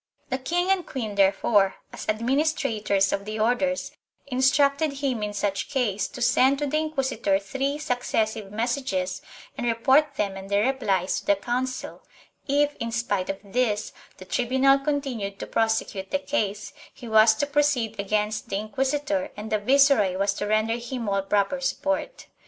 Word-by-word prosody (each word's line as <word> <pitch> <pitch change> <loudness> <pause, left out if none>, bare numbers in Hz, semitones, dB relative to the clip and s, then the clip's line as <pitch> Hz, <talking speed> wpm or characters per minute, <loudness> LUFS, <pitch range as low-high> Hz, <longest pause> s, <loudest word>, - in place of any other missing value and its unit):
The 260 - 0
king 350 +8 0
and 385 -2 +2
queen 230 -10 -5
therefore, 200 0 +3 0.2
as - - -7
administrators 230 -4 +1
of 200 - -2
the 215 +1 -5
Orders, 250 +5 0 0.3
in 255 -2 -4
structed 280 +3 +3
him 270 -5 -2
in 210 0 -2
such 200 -1 -2
case 225 -7 0
to 245 - -5
send 260 +3 +4
to 295 - -1
the 300 +2 0
inquisitor 265 -10 0
three 270 +8 -2
successive 225 -7 -2
messages 225 -5 -2 0.3
and 240 - -3
report 270 +6 +3
them 200 -2 -1
and 195 0 -9
their 200 +2 +2
replies 200 -9 0
to - - -16
the 200 - +5
Council; 250 +5 -3 0.5
if, 290 +1 +2
in 230 0 -4
spite 205 -5 -1
of 195 - -2
this, 210 0 -1 0.2
the 185 - -11
tribunal 265 +5 +3
continued 270 -9 -3
to - - -6
prosecute 220 -3 -1
the - - +1
case, 215 -8 -2 0.2
he 240 - -11
was 220 0 +6
to 285 - 0
proceed 285 -7 0
against 210 +2 -1
the - - -2
inquisitor 280 +7 -1
and 210 +1 -7
the 215 - +2
viceroy 255 -5 +4
was 200 +1 +1
to 205 - -4
render 215 +2 +1
him 240 -1 -5
all 195 -1 +1
proper 205 +7 0
support. 290 - -2
235 Hz, 165 wpm, -25 LUFS, 205-275 Hz, 0.5 s, was